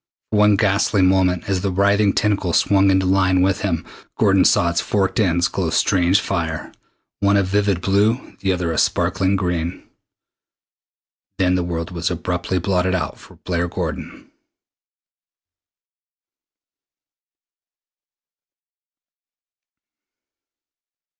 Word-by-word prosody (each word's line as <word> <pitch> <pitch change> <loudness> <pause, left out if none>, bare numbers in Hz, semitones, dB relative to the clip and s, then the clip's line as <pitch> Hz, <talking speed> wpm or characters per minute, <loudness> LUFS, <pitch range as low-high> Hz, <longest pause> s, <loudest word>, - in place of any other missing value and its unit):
For 105 - 0
one 105 0 +4
ghastly 100 0 +1
moment, 95 -1 +2
as 95 -2 -1
the 100 - -1
writhing 100 +2 +2
tentacle 100 -5 0
swung 100 +2 +3
into 95 0 +2
line 95 -1 +2
with 95 0 0
him, 85 -5 -2 0.3
Gordon 95 -3 +3
saw 85 0 +3
its 85 - 0
forked 100 +1 -1
ends 85 -4 +2
glow 90 -4 -3
strange 90 +2 +2
fire 80 -4 -4 0.5
one 100 0 +2
a 100 - +2
vivid 100 -1 0
blue, 105 +6 0
the 95 - 0
other 90 -2 -2
a 80 - -1
sparkling 95 +1 +1
green. 90 -2 -3 1.5
Then 90 -1 +1
the 90 - +1
world 85 -1 -4
was 85 -1 -2
abruptly 90 +1 -3
blotted 90 0 0
out 90 - -4
for - - -16
Blair 85 -1 -1
Gordon. - - -6
95 Hz, 115 wpm, -20 LUFS, 90-100 Hz, 1.5 s, one